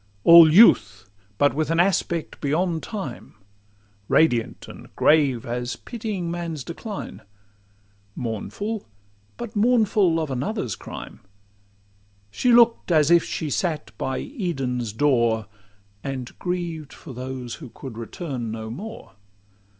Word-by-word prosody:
All 170 -2 +9
youth—but 105 - +3
with 155 +1 -1
an 165 0 +1
aspect 175 -3 0
beyond 160 +3 0
time; 195 - -7 0.7
Radiant 125 -7 +2
and - - -11
grave—as 125 -5 +2
pitying 210 -7 -5
man's 170 -5 -4
decline; 200 - -7 0.9
Mournful—but 110 - -7
mournful 210 -6 +3
of 155 -3 -3
another's 130 - -2
crime, - - -9 1.1
She 250 - +1
look'd 235 -5 +5
as 155 -1 +4
if 170 -1 +6
she 155 -2 -4
sat 155 0 -2
by 130 0 -2
Eden's 135 - -3
door. 115 -3 +2 0.6
And 130 -3 -5
grieved 170 -4 -4
for 140 - -11
those 125 -1 -6
who 135 - -8
could 125 +1 -9
return 120 +1 -5
no 110 0 -6
more. 220 - -8
150 Hz, 110 wpm, -23 LUFS, 120-180 Hz, 1.1 s, All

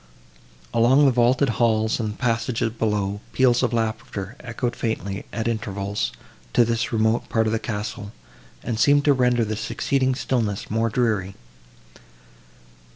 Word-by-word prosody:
Along 130 +5 +5
the 135 - +5
vaulted 125 +3 +3
halls 110 -1 +2
and 110 -2 -3
passages 115 -2 0
below, 105 -3 -1
peals 125 -2 +3
of 125 -3 +1
laughter 110 -2 -3
echoed 120 0 -3
faintly, 100 -4 -3
at 115 0 -3
intervals, 105 -3 -2 0.4
to 120 - +5
this 115 +1 -1
remote 110 0 +1
part 110 -1 +1
of 110 - 0
the 115 - 0
castle, 105 -2 -5 0.5
and 110 -2 -3
seemed 145 +4 +4
to 145 - +6
render 125 -3 +2
the 110 0 -3
succeeding 130 +5 0
stillness 115 -8 -2
more 115 +1 +1
dreary. 105 -5 0
115 Hz, 140 wpm, -23 LUFS, 110-125 Hz, 0.5 s, to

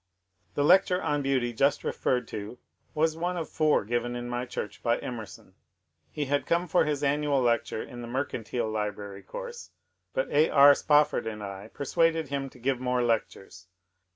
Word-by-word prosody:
The 145 - +1
lecture 180 +3 +5
on 145 -5 0
Beauty 130 -3 0
just 140 +5 +2
referred 125 -2 -1
to 105 +3 -6 0.4
was 160 +1 +2
one 175 +2 -2
of 165 - -3
four 155 -8 +2
given 120 +2 -1
in 120 0 -5
my 120 +1 -3
church 105 - -6
by 115 0 +2
Emerson. 115 -4 -8 0.6
He 150 - -3
had 145 +1 -1
come 170 +1 +1
for 170 0 +3
his 145 -1 -1
annual 145 0 +2
lecture 120 -3 0
in 120 -1 -9
the 120 - -7
Mercantile 120 -2 -2
Library 105 -2 -4
course, 485 -1 -8 0.4
but - - -1
A. 155 +2 +4
R. 140 0 +8
Spofford 150 -4 +2
and 105 -2 -5
I 100 0 -7
persuaded 160 +1 +1
him 140 -1 -3
to 130 - -17
give 130 +1 -1
more 125 -1 0
lectures. 95 -6 -2
135 Hz, 175 wpm, -28 LUFS, 120-150 Hz, 0.6 s, R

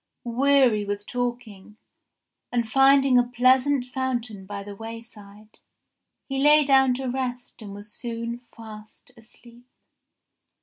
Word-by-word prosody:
Weary 250 -2 +2
with 205 0 -5
walking, 240 -5 -5 0.7
and 235 -2 -1
finding 270 +1 +4
a - - +3
pleasant 255 +2 +3
fountain 245 -6 -4
by 200 0 -6
the 205 0 -9
wayside, 215 -1 -12 0.7
he 270 -1 -3
lay 295 +1 +5
down 265 -2 +4
to 265 +1 -5
rest 250 -1 -5
and 200 -2 -9
was 205 +1 -10
soon 235 0 -5
fast 220 +1 -13
asleep. 235 +1 -17
240 Hz, 120 wpm, -24 LUFS, 215-260 Hz, 0.7 s, lay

